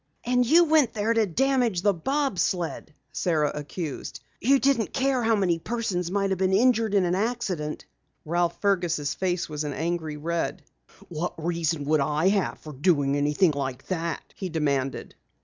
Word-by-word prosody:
"And 250 +1 +2
you 335 +6 +6
went 305 -7 +3
there 215 +2 +1
to 225 -2 +2
damage 245 -2 +1
the 205 -1 +4
bob 270 - -1
sled!" 170 -2 -1 0.2
Sara 155 -4 0
accused. 150 0 -6 0.2
"You 275 +4 +4
didn't 270 -5 +1
care 265 -1 +1
how 225 -1 +3
many 180 -5 +1
persons 190 -4 -2
might 195 0 0
be 190 +1 +2
injured 230 -4 +3
in 195 -2 +4
an 175 - 0
accident!" 185 -7 -2 0.4
Ralph 170 +1 0
Fergus' 175 -7 +1
face 180 -2 -1
was 150 -1 -4
an 145 -1 -3
angry 160 -1 -3
red. 165 +2 -2 0.5
"What 170 +1 -3
reason 165 -2 -1
would 155 +1 +2
I 150 +5 +2
have 200 -2 0
for 155 - -10
doing 145 -2 +2
anything 150 +5 +2
like 135 -2 -4
that?" 170 -3 -2
he 190 - -5
demanded. 140 -5 -1
175 Hz, 165 wpm, -26 LUFS, 155-220 Hz, 0.5 s, you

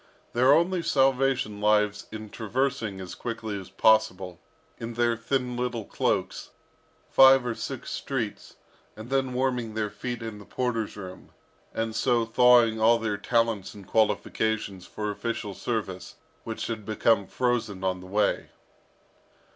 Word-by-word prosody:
Their 125 +3 +5
only 170 +4 +3
salvation 135 -7 +1
lies 105 -1 +2
in 110 -1 -8
traversing 115 -3 -2
as 95 -1 -7
quickly 110 -3 -4
as 95 - -12
possible, 95 -5 +2 0.4
in 115 0 -6
their 120 0 +2
thin 125 +2 -2
little 120 -3 -2
cloaks, - - -1 0.6
five 135 -1 +7
or 120 - -1
six - - -6
streets, - - -4 0.4
and 110 +4 -9
then 135 -1 +1
warming 125 -4 -1
their 105 -2 -1
feet 120 -2 -5
in 110 -2 -6
the 105 - -12
porter's 115 -5 -2
room, 95 -2 -9 0.4
and 115 0 -3
so 120 -1 +2
thawing 115 -1 +5
all 115 +1 +6
their 110 -2 -2
talents 115 -1 0
and 100 -2 -11
qualifications 110 -3 0
for 105 -1 -3
official 105 -1 -4
service, 100 -5 -4 0.3
which 110 -1 -4
had 110 -2 -4
become 110 -1 +2
frozen 120 -6 -1
on 95 -1 0
the 90 - -11
way. 105 +2 0
115 Hz, 140 wpm, -27 LUFS, 105-125 Hz, 0.6 s, five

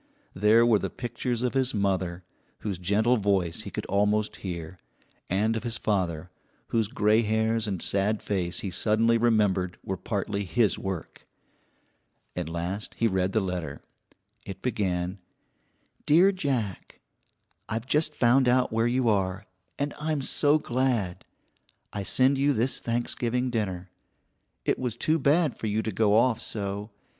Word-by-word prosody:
There 110 +4 +5
were 115 -3 +4
the - - -3
pictures 120 0 -3
of 125 - 0
his 130 -3 +2
mother, 95 -3 -1 0.4
whose 100 -4 -3
gentle 105 +7 +2
voice 95 -5 0
he - - -7
could - - -5
almost 105 +2 +1
hear, 85 -2 -6 0.5
and 105 +5 +1
of 110 - -2
his 115 -1 -3
father, 90 -5 -1 0.4
whose 115 -3 +1
gray 110 -2 +3
hairs 110 0 0
and 95 -4 -2
sad 100 +2 0
face 90 -4 -2
he 95 - -4
suddenly 110 +5 +2
remembered 105 -6 +2
were 95 - -3
partly 100 +1 -2
his 110 +2 +1
work. 95 -4 -6 1.1
At 90 -3 -3
last 85 +5 -4
he 115 - +1
read 95 -3 +1
the 110 - +1
letter. 90 -3 -4 0.6
It 100 -2 -9
began: 95 -5 -1 0.9
DEAR 175 +6 +6
JACK: 130 - -3 0.7
I've 115 +2 -2
just 150 +3 +1
found 125 +2 +4
out 125 -1 +2
where 115 +1 +2
you 125 0 +1
are, 95 -2 0 0.3
and 145 0 -2
I'm 150 -2 -1
so 145 +2 +3
glad. 125 - -1 0.7
I 100 - -3
send 130 +7 +2
you 140 +1 +3
this 120 +3 0
Thanksgiving 120 +1 -1
dinner. 95 -5 -3 0.7
It - - +1
was 120 -3 -2
too 155 +6 +1
bad 150 +1 +2
for 110 - -3
you 110 +1 0
to 110 - -2
go 105 +1 +2
off 115 0 +3
so. 100 0 -3
110 Hz, 150 wpm, -27 LUFS, 95-120 Hz, 1.1 s, DEAR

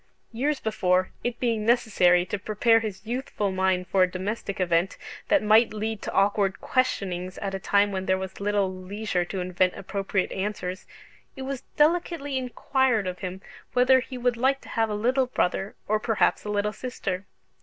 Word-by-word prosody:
Years 275 +5 -1
before, 185 -4 +1
it 240 -1 -2
being 230 -3 0
necessary 200 -7 +4
to 200 - -3
prepare 220 +3 +3
his 215 -2 -6
youthful 230 -4 -2
mind 190 -1 +1
for 190 +1 +1
a 185 - +5
domestic 200 +2 -4
event 175 0 +1 0.3
that 300 -5 +3
might 215 +1 +5
lead 220 0 -3
to - - -4
awkward 200 0 +2
questionings 185 -8 -1
at 195 -1 -4
a 195 - -2
time 200 +2 +2
when 190 -1 -3
there 190 0 +3
was 190 0 -6
little 200 -2 +1
leisure 185 0 -2
to 190 +2 -5
invent 180 0 +1
appropriate 195 0 -2
answers, 190 -2 -4 0.5
it 265 - -6
was 270 -1 -4 0.2
delicately 305 -2 +2
inquired 255 -3 +1
of 180 -1 -4
him 185 0 -5 0.3
whether 255 +1 +5
he 255 0 -7
would 245 -1 0
like 265 +3 +2
to - - -13
have 225 -1 0
a 210 - -2
little 250 +5 +1
brother, 195 -4 -1
or 215 +1 +2
perhaps 220 0 +1
a - - -4
little 210 0 0
sister? 200 -7 -4
205 Hz, 175 wpm, -26 LUFS, 190-240 Hz, 0.5 s, a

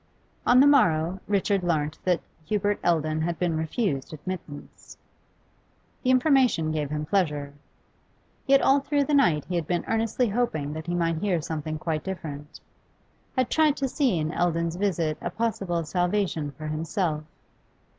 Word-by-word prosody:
On 250 - +6
the 275 - +7
morrow 190 - +3
Richard 200 -1 +1
learnt 155 -3 -1
that 180 -2 +2 0.3
Hubert 205 -1 0
Eldon 155 -2 +1
had 170 +1 -1
been 175 -3 0
refused 160 - -2
admittance. 155 -2 -8 1.0
The 255 - 0
information 255 - +3
gave 150 -2 -2
him 150 0 -3
pleasure. 150 -5 0 0.9
Yet 275 0 +5
all 275 +1 +5
through 285 +1 0
the 295 - -2
night 170 - +3
he 180 - -6
had 170 -3 -1
been 175 -1 -1
earnestly 225 +2 +1
hoping 195 -11 -1
that 160 +1 -7
he 175 - -1
might 165 -1 0
hear 185 -2 +1
something 155 0 -4
quite 155 0 -2
different, 150 -6 -7 0.8
had 255 -2 +1
tried 310 -2 +3
to 275 - 0
see 260 - +1
in 155 0 -1
Eldon's 170 -1 0
visit 170 -6 0
a - - -2
possible 195 -7 -1
salvation 175 -2 -1
for 155 +3 -10
himself. 155 +1 -2
175 Hz, 155 wpm, -26 LUFS, 155-210 Hz, 1.0 s, the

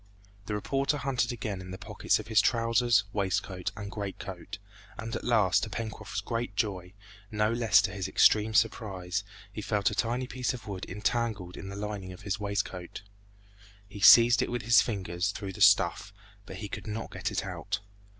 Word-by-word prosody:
The 105 - -2
reporter 135 +7 0
hunted 130 -3 0
again 105 -5 -4
in 90 - -10
the 95 - -6
pockets - - 0
of - - -7
his 110 -2 +4
trousers, 115 -2 +3
waistcoat, 95 -1 -1
and 100 -1 -6
great 100 -2 -5
coat, 95 +3 -8 0.4
and 115 +1 -5
at - - -4
last 100 -6 +3
to 110 - -3
Pencroft's 110 -2 -5
great 115 0 -3
joy, 95 -5 -2 0.4
no 105 0 +1
less 110 -4 +4
to 95 - -1
his 95 -1 -4
extreme 110 +2 +4
surprise, 100 -3 0 0.3
he 105 - -5
felt 105 -1 +1
a - - -4
tiny 120 +2 -1
piece 125 0 -2
of 120 - -11
wood 95 -3 -5
entangled 105 -2 -2
in 95 - -8
the 100 - -7
lining 100 -2 -5
of 90 - -13
his 100 0 -2
waistcoat. 100 -3 -4 0.8
He 100 +1 -10
seized 115 +3 +8
it - - -1
with 120 -2 -3
his 120 0 +6
fingers 95 -3 -2
through 100 -1 -5
the - - -9
stuff, 100 - +4 0.4
but - - -8
he 105 - -6
could 100 - -7
not 110 +1 -5
get - - -3
it - - -2
out. 105 +2 -4
105 Hz, 190 wpm, -29 LUFS, 95-115 Hz, 0.8 s, seized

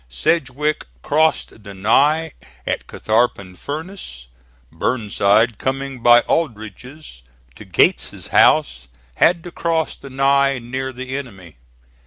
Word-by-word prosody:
Sedgwick 145 - -1 0.2
crossed 155 -7 0
the 100 -1 -10
Ny 145 +11 +2 0.3
at - - -3
Catharpin 110 -4 -1
Furnace. 150 - -7 0.5
Burnside 110 -1 +1
coming 135 0 -3
by 120 0 +7
Aldrich's 125 - -4 0.3
to 105 - -13
Gates's 90 -5 +1
house, 65 +1 +3 0.3
had 170 -1 +3
to 175 - -9
cross 165 -2 -1
the 140 - -12
Ny 135 0 +2
near 130 +2 -5
the 130 +1 -6
enemy. 95 - -9
130 Hz, 110 wpm, -19 LUFS, 105-145 Hz, 0.5 s, by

